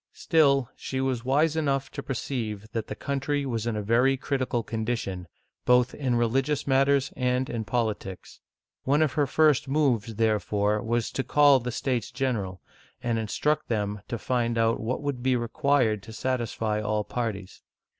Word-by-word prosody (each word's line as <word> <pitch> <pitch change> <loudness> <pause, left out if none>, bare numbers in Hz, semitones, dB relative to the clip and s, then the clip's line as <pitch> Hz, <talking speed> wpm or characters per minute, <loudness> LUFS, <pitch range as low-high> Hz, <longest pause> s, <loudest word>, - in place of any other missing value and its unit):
Still, 140 -6 +3
she 130 - -4
was 130 -3 -1
wise 150 +5 +2
enough 140 -4 0
to 140 - -5
perceive 115 -6 -4
that 115 -2 -3
the 105 - -5
country 140 +3 -2
was 115 -3 -2
in 115 - -1
a 105 - -2
very 125 +5 +3
critical 130 -3 -1
condition, 110 -5 -3 0.4
both 125 0 +4
in 130 -4 -1
religious 135 +5 +1
matters 140 0 +2
and 125 0 0
in 115 -2 -2
politics. 105 -4 -3 0.4
One 145 +4 +3
of 150 - 0
her 145 -2 +1
first 150 -2 +3
moves, 130 -7 +1
therefore, 105 -1 +1
was 120 0 -1
to 135 - -2
call 145 -2 +5
the 125 0 -4
States 125 -2 -2
General, 110 -9 -2 0.4
and 115 -1 0
instruct 150 +8 0
them 105 -2 -2
to 120 - -3
find 120 -1 -1
out 115 0 +2
what 125 +6 -3
would 140 -4 -2
be 130 0 +2
required 120 -2 +1
to 110 +2 -11
satisfy 115 -3 -1
all 105 0 0
parties. 105 -5 -4
125 Hz, 165 wpm, -27 LUFS, 110-135 Hz, 0.4 s, call